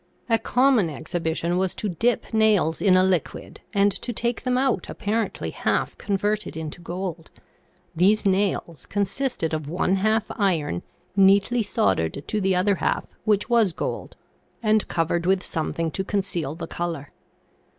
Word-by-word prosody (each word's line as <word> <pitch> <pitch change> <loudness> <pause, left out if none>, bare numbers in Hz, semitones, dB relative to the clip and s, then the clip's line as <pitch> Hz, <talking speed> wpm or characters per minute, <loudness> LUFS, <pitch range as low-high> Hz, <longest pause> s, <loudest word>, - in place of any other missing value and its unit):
A 225 - +4
common 250 -8 +3
ex 160 +3 -9
hibition 170 +1 0
was 190 -1 0
to 215 - -2
dip 230 +7 0
nails 210 -8 +3
in 185 -3 +5
a 185 - +5
liquid 185 -5 -2
and 200 -1 +3
to 240 - -4
take 235 +1 -2
them 250 -1 0
out 255 -8 0
apparently 220 +2 -2
half - - -1
converted 205 -2 -1
into 160 +2 -6
gold; 175 -1 -5 0.7
these 200 +6 +3
nails 190 -4 0
consisted 205 - -1
of 155 -2 -3
one 185 +3 +1
half 215 +2 +2
iron 160 - +1 0.3
neatly 200 +4 +4
soldered 95 - 0
to 215 - -1
the 190 -1 +2
other 190 +2 +2
half, - - 0 0.2
which 210 -2 +2
was 230 -7 +3
gold, - - -4 0.5
and 215 -1 +3
covered 170 +1 0
with 190 -1 +2
something 165 0 -2
to 190 - -2
conceal 185 -7 -2
the 170 - -5
color. 165 -5 -4
190 Hz, 150 wpm, -24 LUFS, 165-215 Hz, 0.7 s, in